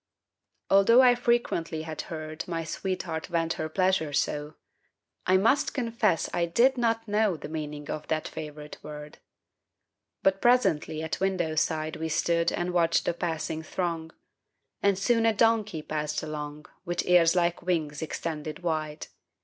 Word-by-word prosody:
Although 230 +6 +7
I 250 -1 +7
frequently 235 -10 0
had 160 -1 -5
heard 155 -1 -6
My 165 -2 -2
sweetheart 165 -1 -3
vent 165 -2 0
her 155 - -4
pleasure 185 -3 +1
so, 150 +2 -1 0.7
I 185 +1 +5
must 230 +9 +2
confess 230 -8 +1
I 170 -1 +1
did 245 +10 +4
not 230 -2 0
know 210 -3 +2
The 150 - -7
meaning 150 -2 -5
of 155 - -5
that 155 -1 -1
favorite 150 -1 -8
word. 150 0 -9 1.0
But 195 0 +2
presently 190 -10 +2
at 160 - -3
window 185 -4 0
side 155 0 -1
We 160 0 -3
stood 170 +1 +1
and 175 +1 -2
watched 170 -1 +2
the - - +1
passing 160 -2 -3
throng, 165 -1 -3 0.7
And 200 -1 +3
soon 230 +3 +2
a 225 - +4
donkey 215 -7 +2
passed 150 0 -3
along 150 -1 -6 0.2
With 175 0 -2
ears 175 -1 +5
like 175 -1 +1
wings 160 -5 -1
extended 155 0 -4
wide. 155 -2 -2
165 Hz, 150 wpm, -27 LUFS, 155-195 Hz, 1.0 s, Although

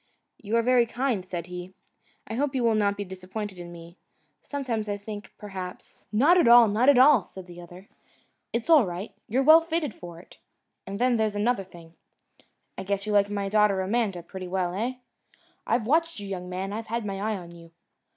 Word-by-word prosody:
"You 220 +2 -1
are 230 - +2
very 245 -1 +4
kind," 240 -4 -1
said 175 -2 -5
he, 180 +1 -8 0.5
"I - - -7
hope 275 +3 -1
you 255 - 0
will 230 -1 +3
not 205 -1 +1
be 205 - -4
disappointed 190 +1 -7
in 175 0 -8
me. 170 +1 -12 0.4
Sometimes 240 -7 -3
I 205 - -2
think, 205 0 -8
perhaps 190 -3 -9
" - - -46
"Not 290 +12 +5
at 295 - +4
all, 235 -1 +8
not 220 +6 +3
at 280 - +6
all," 260 -4 +6
said 190 0 -11
the 175 -1 -11
other. 175 +3 -13 0.6
"It's 235 0 -3
all 315 -5 +7
right. 180 +4 -6
You're 250 +4 +1
well 315 +3 +8
fitted 325 -6 -2
for 170 -1 -11
it. 175 - -18 0.5
And 195 +1 -5
then, 245 +1 +2
there's 215 -2 0
another 210 0 0
thing. 170 -3 -15 0.9
I - - -4
guess 200 +1 -2
you 215 - -3
like 205 0 +3
my 200 -1 -2
daughter 210 -1 +3
Amanda 195 -2 -1
pretty 185 +1 -8
well. 180 -1 -1
Eh? 230 +7 -2 0.7
I've 230 -2 +1
watched 330 +2 +1
you, 200 - -7
young 180 -2 -5
man. 190 +2 -4
I've 225 +1 -5
had 230 0 -3
my 195 -1 -4
eye 215 0 -1
on 175 -2 -10
you! 170 -1 -14
205 Hz, 210 wpm, -26 LUFS, 185-235 Hz, 0.9 s, all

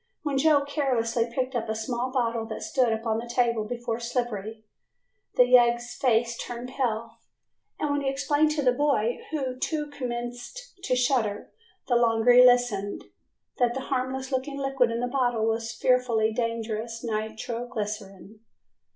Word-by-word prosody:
When 285 -3 0
Joe 290 -1 +4
carelessly 240 -5 0
picked 255 +2 -2
up 230 -2 -2
a 220 - -1
small 245 +3 -2
bottle 230 -3 -1
that 220 - -6
stood 250 -3 +1
upon 220 0 -1
the 235 +1 -7
table 235 -3 +1
before 235 0 -3
Slippery, 225 -3 -3 0.7
the 250 - +7
yegg's 240 -1 +4
face 235 -2 +1
turned 240 +1 -6
pale, 230 -4 -2 0.6
and 295 - 0
then 285 - 0
he 270 - 0
explained 290 +3 +2
to 300 -2 -1
the 250 - +5
boy 245 -4 +1
who 260 -5 -3
too 300 +1 -2
commenced 245 - -6
to 255 - +2
shudder 245 -5 0 0.4
the 245 - +3
longer 230 0 +4
he 250 +1 +8
listened, 245 -5 +2 0.5
that 240 -1 +2
the 265 - -2
harmless 265 +1 -2
looking 270 +2 -2
liquid 270 -3 +1
in 230 +1 -2
the 245 - 0
bottle 245 -4 +1
was 225 0 -1
fearfully 235 -3 +2
dangerous 230 0 -3
nitro 225 +2 -3
glycerine. 210 -3 -6
240 Hz, 155 wpm, -26 LUFS, 225-260 Hz, 0.7 s, he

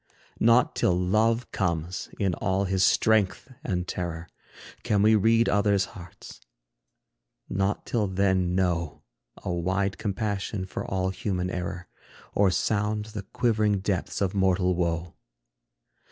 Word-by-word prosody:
Not 115 +2 +4
till 90 - +2
Love 110 +6 +1
comes 85 -2 -2
in 95 -3 0
all 95 +2 0
his 95 -1 +1
strength 110 +5 +2
and 90 -2 -2
terror, 85 -2 -4 0.5
Can 100 -1 +1
we 110 +1 +6
read 115 +2 +4
other's 100 -2 +2
hearts; 85 -3 -12 1.1
not 95 +1 -1
till 110 -4 0
then 95 -1 +1
know 85 -4 -1 0.4
A 95 - -2
wide 95 +3 -1
compassion 100 -2 -2
for 95 - -5
all 95 0 -1
human 90 -2 -2
error, 90 -1 -4 0.5
Or 100 -1 +4
sound 105 +3 0
the 105 - -4
quivering 110 -4 +2
depths 95 -1 -2
of 95 -2 +1
mortal 95 -2 +2
woe. 85 -1 -2
95 Hz, 125 wpm, -26 LUFS, 90-105 Hz, 1.1 s, we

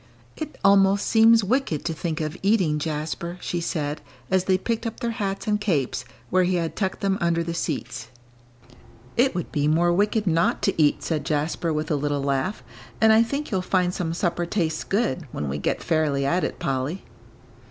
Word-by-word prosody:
"It 310 -1 -6
almost 195 0 +5
seems 225 0 +5
wicked 220 - 0
to 165 - -1
think 160 0 -3
of 155 +1 -3
eating, 190 -7 +2
Jasper," 160 +3 -3
she 175 -1 -3
said, 150 -3 -2 0.3
as 190 -1 +2
they 190 -1 +3
picked 230 +4 -2
up 225 - -6
their 235 - -1
hats 200 -3 -3
and 210 -1 0
capes, 140 - 0 0.3
where 185 0 +4
he 180 +1 +1
had 165 -2 -2
tucked 190 -2 -2
them 195 0 0
under 170 -1 +1
the 170 0 -3
seats. 125 -8 -4 1.1
"It 245 -3 +3
would 175 - -3
be 145 -2 +1
more 170 +3 +3
wicked 210 +3 +1
not 170 -2 +1
to - - +1
eat," 145 -1 +3
said 155 -3 -1
Jasper, 160 +1 -1
with 155 +1 -2
a - - +3
little 145 -1 -1
laugh, 140 +8 -1 0.4
"and 220 0 +6
I 220 - +6
think 280 +6 -2
you'll 190 -3 +1
find 180 -1 +1
some 165 -2 -2
supper 175 -1 -1
tastes 165 -5 -1
good, 195 -6 -1
when 75 - -4
we 70 +2 -3
get - - -1
fairly 150 -4 +1
at 175 +6 +1
it, - - -2
Polly." 135 +7 -2
175 Hz, 195 wpm, -24 LUFS, 155-200 Hz, 1.1 s, and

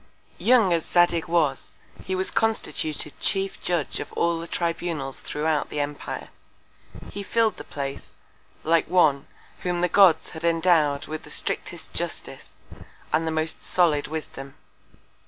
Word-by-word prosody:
Young 230 -7 +4
as 165 -1 +1
Zadig 175 -1 +2
was, 155 -6 0 0.3
he 190 - -1
was 185 0 +1
constituted 160 -9 0
chief 195 -1 -1
Judge 175 -5 -1
of - - -6
all 170 -1 +1
the 165 - -6
Tribunals 165 -6 -2
throughout 150 0 -1
the 150 - -4
Empire. 145 0 -4 0.8
He 205 - -5
fill'd 225 +2 +1
the - - -7
Place, 140 -1 -6 0.5
like 165 +1 +2
one, 150 -7 +3 0.3
whom 175 -1 -1
the 180 - +3
Gods 175 -3 +5
had 160 - -9
endow'd 165 -4 +3
with 155 0 -5
the - - -14
strictest - - -3
Justice, - - -6 0.6
and 165 +1 +2
the - - 0
most 160 0 -1
solid 160 -5 +2
Wisdom. 140 -3 -7
165 Hz, 140 wpm, -25 LUFS, 150-180 Hz, 0.8 s, Gods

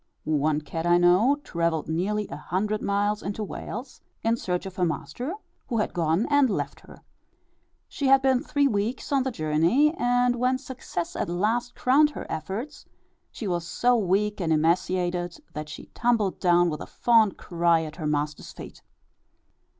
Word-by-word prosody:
One 150 0 +1
cat 165 +2 -4
I 175 0 +5
know 180 +10 +4
travelled 170 -2 -1
nearly 200 +6 -1
a - - -5
hundred 210 +4 -2
miles 205 +1 0
into 205 +2 -4
Wales, 240 +5 -7 0.2
in 225 +1 +2
search 180 -6 -3
of 190 -1 -8
her 180 - +1
master, 240 - -3 0.3
who 235 - -2
had 210 - -1
gone 165 +5 +1
and 285 -3 +5
left 205 - -3
her. - - -16 0.8
She 280 - -2
had 270 0 +5
been 260 -2 +3
three 285 -1 +1
weeks 220 +3 -2
on 275 -1 +3
the 265 - -1
journey, 170 - +2
and 245 -2 +2
when 255 +2 +2
success 255 -10 -6
at - - -2
last 225 +7 -1
crowned 285 +4 +4
her 295 - -7
efforts, 210 - -5 0.4
she 220 - -6
was 175 -2 -2
so 245 +5 +2
weak 210 0 +1
and 165 -2 0
emaciated, 175 +2 +1 0.2
that 150 0 -6
she 145 - -9
tumbled 225 -5 +1
down 175 -1 +3
with 150 - -5
a - - -7
fond 225 -5 +3
cry 170 -1 +1
at 155 0 -8
her 155 -4 -3
master's 150 0 -2
feet. - - -11
200 Hz, 170 wpm, -26 LUFS, 170-245 Hz, 0.8 s, I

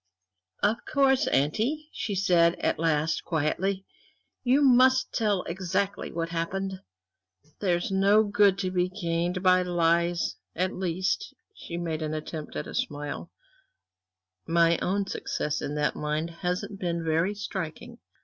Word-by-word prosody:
"Of 210 +2 +3
course, 270 -2 +3
auntie," 230 - 0
she 215 -5 -3
said 175 -3 +4
at - - -1
last, 160 0 +1
quietly, 185 +5 -1 0.6
"you 265 +3 +4
must 260 0 +5
tell 210 -5 +1
exactly 190 +3 -2
what 165 0 -3
happened. 190 +3 -3 0.8
There's 175 -2 0
no 200 +3 +4
good 205 -2 +3
to 185 - -1
be 180 0 +1
gained 175 -1 -2
by 185 0 +5
lies; 170 -1 +1 0.2
at 185 +2 0
least" 185 - -2 0.2
she 170 - -7
made 165 -2 -3
an 155 0 -2
attempt 155 0 -6
at - - -3
a - - -8
smile 145 0 -3 1.2
"my 170 0 +3
own 200 +2 0
success 150 -5 -3
in 145 0 -3
that 150 0 0
line 150 +2 -2
hasn't 180 +3 -3
been 170 -2 -2
very 165 +5 +1
striking. 205 - -6
180 Hz, 135 wpm, -27 LUFS, 165-200 Hz, 1.2 s, must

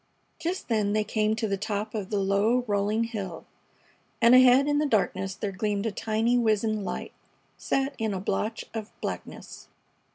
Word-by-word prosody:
Just 345 +4 -3
then 210 -3 +1
they 215 0 +2
came 215 0 0
to 220 0 -1
the 200 -1 -1
top 210 +1 -3
of 205 -3 -4
the 210 - -1
low, 200 +5 +2
rolling 210 +1 +1
hill, 200 -7 -5 0.7
and 235 0 +6
ahead 255 +2 +7
in 290 0 +2
the 300 - +2
darkness 195 -5 0
there 205 - -3
gleamed 205 +1 -2
a 225 - 0
tiny, 225 +3 +1
wizened 215 -2 +1
light - - -5 0.4
set 275 +1 -1
in 220 -1 0
a 190 - -2
blotch 210 +3 -2
of 220 -1 -5
blackness. - - -7
215 Hz, 170 wpm, -27 LUFS, 200-230 Hz, 0.7 s, ahead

